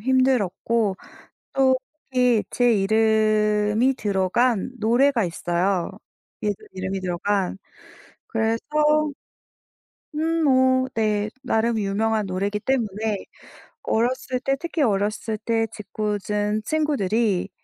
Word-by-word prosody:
힘들었고 230 -4 +1 0.6
또 265 -1 +4 0.4
특히 250 -4 +3
제 245 -1 +3
이름이 215 +2 +2
들어간 210 +2 0
노래가 240 +2 +3
있어요. 175 +2 -1 0.5
얘들 205 -2 -3
이름이 190 +1 -3
들어간. 185 +2 -1 0.7
그래서 225 0 -1 1.5
음 325 +1 0
뭐 260 -1 +3
네, 215 -1 0 0.2
나름 225 -2 +1
유명한 215 +1 0
노래이기 200 +3 -2
때문에 220 -4 -1 0.6
어렸을 255 +2 0
때 270 +1 +1
특히 335 -2 -3
어렸을 215 0 0
때 225 -1 0
짖궂은 210 0 -2
친구들이 225 - 0
220 Hz, 215 characters per minute, -23 LUFS, 205-250 Hz, 1.5 s, 또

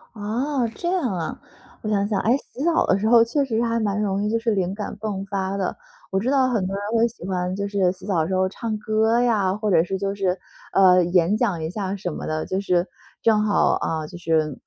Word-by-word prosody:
哦， 235 +4 -1
这 345 - -4
样 370 - +1
啊， 170 -3 -4 0.4
我 215 - -4
想 200 -1 +1
想。 205 -2 0
诶， 240 +5 +3
洗 275 - -8
澡 335 0 +3
的 190 - +2
时 215 - 0
候 235 -1 +7
确 280 +5 0
实 230 -4 -2
是 230 - +2
还 230 0 0
蛮 210 -1 0
容 200 -1 0
易 210 - 0
就 230 - +1
是 230 0 0
灵 190 -2 0
感 210 0 -5
迸 200 -3 -3
发 195 0 -2
的。 190 -2 -2 0.4
我 190 - +1
知 235 +6 -1
道 270 -2 +3
很 205 -7 0
多 195 - -3
人 200 - -4
会 230 +1 +4
喜 225 -6 -10
欢 180 -1 -1
就 200 0 -2
是 195 -3 +1
洗 185 - -12
澡 190 -5 0
的 160 - -1
时 185 - -1
候 185 0 +2
唱 220 +2 -4
歌 220 +2 +2
呀， 210 -6 +2
或 210 -1 -1
者 165 -3 +5
是 190 +2 -3
就 195 0 -2
是， 190 -2 0 0.3
呃， 185 -2 +6
演 175 +3 +2
讲 200 -9 0
一 160 - -3
下 195 0 -3
什 185 -3 -4
么 - - -6
的， 155 0 -2
就 190 +1 -2
是 180 -2 +1 0.4
正 220 -2 +4
好， 205 -1 +3
啊， 160 -1 -2
就 - - -11
是 160 -4 0
200 Hz, 270 characters per minute, -23 LUFS, 185-225 Hz, 0.4 s, 候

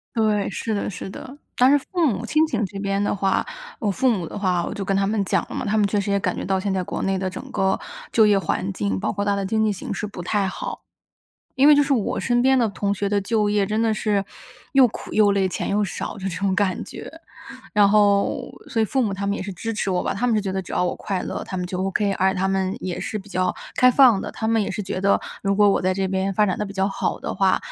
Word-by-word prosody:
对， 215 -3 +1
是 220 +3 -3
的 200 - -2
是 190 0 -7
的。 260 +7 -10 0.2
但 250 +1 +5
是 290 - +6
父 340 +4 -1
母 235 -4 0
亲 310 +6 +3
情 230 -7 -1
这 195 +1 -8
边 195 0 -1
的 205 - 0
话， 195 -1 +1 0.3
我 210 - 0
父 255 +6 +2
母 180 -7 -2
的 - - -7
话 180 -4 0
我 - - -4
就 205 -2 -4
跟 195 0 0
他 195 0 +1
们 210 -1 0
讲 190 - 0
了 - - -6
嘛， - - -2
他 215 +1 +1
们 205 - +3
确 205 +1 0
实 200 - -2
也 200 - +2
感 - - -1
觉 - - -4
到 190 -1 0
现 195 0 -1
在 185 -1 0
国 - - -4
内 195 0 0
的 190 0 -2
整 185 - -7
个 190 0 +1 0.3
就 220 - +5
业 205 -1 +4
环 195 0 -2
境， 100 - -2
包 - - -1
括 200 - -2
它 205 0 +1
的 200 -1 -2
经 220 +2 +1
济 215 - +2
形 195 - -5
势 - - -3
不 200 -3 -8
太 195 +2 0
好。 - - -5 0.8
因 270 - +5
为 300 - +9
就 290 - +5
是 280 0 0
我 225 -6 -1
身 240 -1 +1
边 265 0 +4
的 235 -3 +2
同 200 0 -1
学 200 0 -2
的 205 0 +1
就 210 +1 +1
业， 205 -1 +2
真 215 +2 -1
的 225 -1 +2
是 210 -2 0 0.5
又 270 -2 +7
苦 - - -9
又 210 -2 +5
累， 195 -1 +1
钱 180 - -3
又 210 +1 +2
少 190 - -5
这 195 0 -3
种 195 +1 -1
感 190 -2 0
觉。 - - -9 0.6
然 205 -1 +5
后 200 -1 +2 0.2
所 225 - -1
以 - - +3
父 265 +4 0
母 210 -4 0
他 200 +1 -3
们 200 - 0
也 - - -4
是 195 - -5
支 225 +5 -4
持 210 -3 -1
我 180 - 0
吧， - - 0
他 240 +5 -1
们 230 - +2
是 210 - +1
觉 195 -1 -3
得 190 - -1
只 - - -10
要 180 - +1
我 - - -1
快 195 -3 -3
乐， - - -4
他 185 - -6
们 180 - -2
就 185 +1 -3
OK， 200 +1 0
而 190 0 +2
他 190 +1 0
们 190 +1 0
也 185 -5 -4
是 215 - -3
比 200 - -12
较 185 -2 0 0.2
开 255 0 +5
放 245 -7 +6
的。 - - -5
他 220 - -3
们 225 -1 +2
也 - - -3
是 200 - -4
觉 185 -1 -4
得， 200 +1 +3 0.2
如 195 0 +1
果 205 0 +5
我 - - +1
在 185 +1 +2
这 190 0 0
边 190 +1 -1
发 210 - +4
展 185 - -1
得 210 - -1
比 200 - -8
较 190 0 +1
好 195 - -2
的 - - -4
话， 190 -1 +3
200 Hz, 310 characters per minute, -23 LUFS, 190-215 Hz, 0.8 s, 为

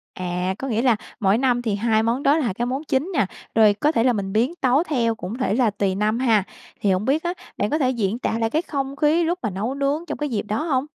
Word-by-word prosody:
À, 180 +1 -2
có 270 - -4
nghĩa 230 -1 0
là 245 -4 +4 0.2
mỗi 200 0 +3
năm 250 -2 +1
thì 220 -4 -1
2 220 +1 +1
món 240 +5 0
đó 290 +3 +4
là 240 -11 0
cái 240 +4 -2
món 265 +5 -3
chính 300 +6 -1
nè, 275 - +2 0.3
rồi 215 -2 +6
có 295 +9 +1
thể 230 -7 +1
là 250 - +3
mình 195 -2 -3
biến 245 +10 +1
tấu 265 +5 +3
theo 235 -8 0
cũng 210 +3 -6
thể 230 -6 0
là 240 -1 +3
tùy 200 -2 -1
năm 215 +3 0
ha. 225 -6 +3 0.4
Thì 200 - +2
hổng 185 +3 0
biết 295 +4 +1
á, 345 +1 -1 0.2
bạn 205 - 0
có 305 - +1
thể 260 -4 +2
diễn 225 -2 -1
tả 225 -2 -1
lại 225 0 +1
cái 310 +6 +1
không 275 -4 -4
khí 310 +4 +2
lúc 345 +2 -1
mà 220 - -1
nấu 205 +7 -3
nướng 280 +4 -1
trong 295 - -4
cái 295 -1 -2
dịp 225 -5 -1
đó 215 +5 -2
hông? 275 -5 0
240 Hz, 280 wpm, -22 LUFS, 210-280 Hz, 0.4 s, rồi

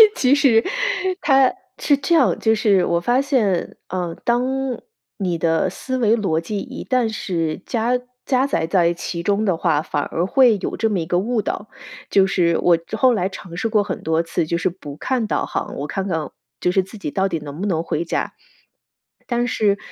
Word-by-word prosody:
其 260 +1 +3
实 235 -6 +4 0.6
它 270 -2 +4 0.3
是 290 - +3
这 280 +5 +1
样， 295 -6 +3
就 220 0 +3
是 205 -4 +3
我 170 0 +1
发 245 +8 +2
现， 225 - 0
呃， 175 -2 -3
当 240 +1 +2 0.7
你 180 -4 -1
的 165 +3 +1
思 260 +7 -4
维 225 -2 +3
逻 185 -7 0
辑 200 +4 -4
一 260 +3 -7
旦 255 -3 +1
是 170 -6 -2
加 240 +1 0 0.3
加 265 0 +2
载 160 - 0
在 170 0 +2
其 170 0 -5
中 205 +4 +1
的 190 -4 +2
话， 160 -3 +1
反 145 - -2
而 170 - -2
会 245 0 +4
有 - - -3
这 225 - +1
么 200 -4 0
一 165 - -2
个 175 +2 +1
误 225 +3 0
导， 210 - -4 0.4
就 195 -1 +4
是 170 -3 +2
我 175 -1 +4 0.2
后 255 +2 +4
来 190 -4 0
尝 180 -3 -10
试 225 +6 -1
过 215 -2 +3
很 200 - -5
多 160 +1 +1
次， 165 - -1
就 170 - 0
是 175 - 0
不 155 -5 -10
看 255 -4 -1
导 - - 0
航， - - -4
我 140 - -4
看 190 +7 -3
看 160 -5 -2 0.3
就 180 - +1
是 190 - +3
自 195 +4 -11
己 150 -7 -5
到 195 0 +1
底 165 - -2
能 145 +1 -8
不 205 - -1
能 165 -4 0
回 165 0 -2
家。 170 - -2 1.0
但 240 0 +1
是 205 -3 +1
195 Hz, 220 characters per minute, -21 LUFS, 170-235 Hz, 1.0 s, 实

